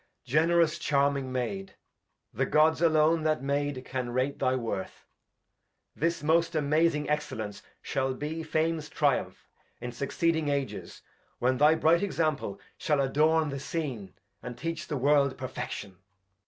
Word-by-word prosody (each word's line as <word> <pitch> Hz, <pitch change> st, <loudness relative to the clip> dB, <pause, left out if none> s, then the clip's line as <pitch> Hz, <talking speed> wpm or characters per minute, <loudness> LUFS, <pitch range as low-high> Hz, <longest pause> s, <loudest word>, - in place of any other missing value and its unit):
Edg. 125 Hz, -, -13 dB
Generous 165 Hz, +1 st, +3 dB
charming 140 Hz, -2 st, +1 dB
Maid, 190 Hz, +10 st, -3 dB, 0.6 s
The -, -, 0 dB
Gods 155 Hz, +1 st, +3 dB
alone 160 Hz, 0 st, +4 dB
that 155 Hz, -4 st, 0 dB
made, 140 Hz, -1 st, -1 dB
can 130 Hz, -2 st, -3 dB
rate 130 Hz, +3 st, -1 dB
thy 130 Hz, 0 st, +2 dB
Worth! 115 Hz, -6 st, -4 dB, 0.9 s
This 165 Hz, 0 st, -1 dB
most 165 Hz, +2 st, +2 dB
amazing 150 Hz, 0 st, +2 dB
Excellence 110 Hz, -9 st, -3 dB, 0.2 s
shall 130 Hz, 0 st, -1 dB
be 150 Hz, +4 st, -4 dB
Fame's 160 Hz, -1 st, -1 dB
Triumph 145 Hz, -4 st, 0 dB, 0.3 s
in 120 Hz, 0 st, -5 dB
succeeding 160 Hz, +5 st, 0 dB
Ages, 140 Hz, -2 st, -3 dB, 0.3 s
when 130 Hz, +1 st, +1 dB
Thy 150 Hz, +2 st, +6 dB
bright 160 Hz, +1 st, +3 dB
Example 155 Hz, -, -1 dB, 0.2 s
shall 150 Hz, -3 st, +1 dB
adorn 155 Hz, +3 st, +2 dB
the 140 Hz, 0 st, -4 dB
Scene, 135 Hz, -, -4 dB, 0.3 s
And 120 Hz, -1 st, -7 dB
teach 165 Hz, +4 st, -4 dB
the 150 Hz, -, -2 dB
World 140 Hz, 0 st, +3 dB
Perfection. 105 Hz, -7 st, -6 dB
150 Hz, 135 wpm, -28 LUFS, 130-160 Hz, 0.9 s, Thy